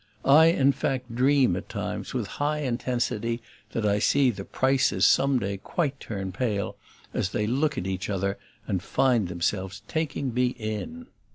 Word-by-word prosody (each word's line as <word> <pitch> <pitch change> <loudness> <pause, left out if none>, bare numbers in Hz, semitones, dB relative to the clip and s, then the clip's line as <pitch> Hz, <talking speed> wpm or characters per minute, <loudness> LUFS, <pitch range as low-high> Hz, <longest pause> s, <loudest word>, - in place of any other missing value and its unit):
I 150 +4 +7
in 140 -5 +4
fact 130 -3 -2
dream 130 -4 +3
at - - -6
times, - - -4
with 125 -5 -2 0.2
high 150 +1 +1
intensity, 120 -3 -1 0.3
that 115 - -1
I 105 0 +2
see 135 +3 +3
the 100 -3 -7
Prices 130 +5 +2
some 140 -1 +4
day 100 -4 -2
quite 140 - -2
turn 95 -3 -5
pale 100 0 -2 0.4
as 90 - 0
they 105 - -1
look 140 +5 0
at 95 - -2
each 95 0 -3
other 100 0 -1 0.3
and 95 - -1
find 120 -2 +2
themselves 95 +2 -2
taking 145 -5 -2
me 125 +1 +1
in. 120 - -5
120 Hz, 165 wpm, -26 LUFS, 100-135 Hz, 0.4 s, I